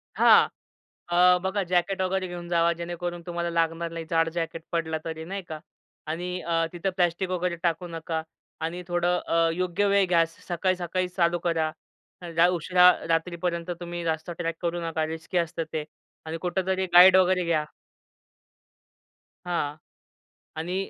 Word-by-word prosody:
हां. - - +6 0.6
अ, 180 +1 +5
बघा 195 +1 0
जॅकेट 180 +2 0
वगैरे 185 0 0
घेऊन 175 -1 -7
जावा, 170 -1 +3
जेणेकरून 175 +1 -5
तुम्हाला 170 0 -2
लागणार 165 0 -1
नाही. 165 -1 -6
जाड 165 0 +2
जॅकेट 165 -1 -3
पडला 160 -2 -1
तरी, 160 -1 -5
नाही 195 +3 -5
का 155 -1 -5 0.5
आणि 180 +3 -3
अ, 165 -1 0
तिथं 175 +2 -2
प्लास्टिक 175 +1 +1
वगैरे 180 -1 -1
टाकू 170 +1 0
नका 165 -1 -4 0.4
आणि 170 +3 -3
थोडं 175 0 +1
अ, 165 0 +3
योग्य 180 +3 0
वेळ 200 -1 +4
घ्या. 175 -2 +4
असं 165 0 -4
सकाळी-सकाळी 185 0 0
चालू 175 -1 +1
करा. 160 -2 +1 0.5
लई 170 0 +3
उशिरा 180 +1 +5 0.2
रात्रीपर्यंत 170 +1 -1
तुम्ही 175 0 -5
रस्ता 160 +1 -2
ट्रॅक 165 -1 -2
करू 175 0 -2
नका. 160 -1 -1
रिस्की 160 +3 -4
असतं 170 -1 -1
ते 155 -1 -2 0.4
आणि 160 +1 -4
कुठेतरी 190 +1 -1
गाईड 180 +1 +9
वगैरे 185 0 +3
घ्या. 160 -3 +1 1.8
हां 170 -5 -1 0.8
आणि 170 +4 -3
175 Hz, 150 wpm, -26 LUFS, 165-180 Hz, 1.8 s, गाईड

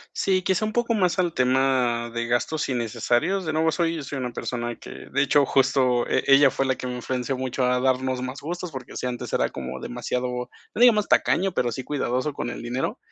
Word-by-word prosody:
Sí, 185 -1 +1
quizá 190 +2 +1
un 215 - -2
poco 240 0 +1
más 185 -3 +1
al 175 -2 +1
tema 125 -3 +1
de 115 0 -2
gastos 120 +6 0
innecesarios. 125 - 0
De 155 - -2
nuevo 160 +1 +2
soy 165 -2 -1
soy 135 0 -5
una 125 -1 -3
persona 120 -1 -3
que - - -12
de - - -2
hecho, 145 -2 +4
justo 130 -2 +2
e - - +1
ella 140 0 +7
fue 135 - -1
la 130 - +2
que 125 - -6
me 125 - -4
influenció 125 +1 -2
mucho 130 0 -2
a 125 0 +2
darnos 130 0 +1
más 130 +2 -5
gustos. 175 +2 -5
Porque 130 -2 -8
si - - -3
antes 120 -1 -4
era - - +2
como 65 0 -6
demasiado, 125 +1 -3 0.5
no 220 - -4
digamos 220 -4 +5
tacaño, 190 0 +2
pero 120 -6 +1
sí 130 +2 -5
cuidadoso 135 0 -1
con 120 - -4
el - - -7
dinero. 125 - -2
130 Hz, 215 wpm, -24 LUFS, 125-160 Hz, 0.5 s, ella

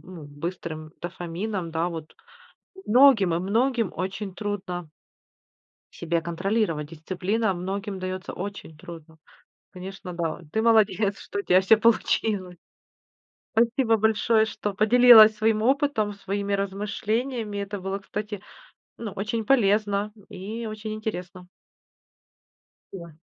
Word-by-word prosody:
ну, 180 -4 -11
быстрым 155 +1 -6
дофамином, 175 +2 -4
да, 165 +2 -1
вот. 160 -3 -8 0.7
Многим 225 -8 +5
и - - +1
многим 225 +3 0
очень 190 +2 -4
трудно 185 -6 -5 1.0
себя 170 0 -1
контролировать. 170 -3 -1
Дисциплина 185 +6 -1
многим 195 +2 -4
даётся 185 0 -5
очень 190 -5 -7
трудно. 160 0 -12 0.5
Конечно, 185 -1 -8
да. 170 -2 -3
Ты 220 - 0
молодец, 215 -3 +3
что - - -5
у - - 0
тебя 185 0 +4
всё 215 +4 +5
получилось! 210 -4 +1 1.0
Спасибо 230 0 +3
большое, 220 +1 +3
что 205 -2 -4
поделилась 220 0 +8
своим 220 0 +1
опытом, 265 -5 +1
своими 200 0 -3
размышлениями. 210 +3 -2
Это 200 0 -4
было, 195 +1 -3
кстати, 210 +1 -6 0.6
ну, 220 -4 -5
очень 215 +3 -3
полезно, 210 -3 +2
м, 205 - -19
и 210 +4 -6
очень 215 0 -5
интересно. 185 -4 -6 1.5
Спасибо. 170 -5 -9
200 Hz, 115 wpm, -25 LUFS, 180-220 Hz, 1.5 s, поделилась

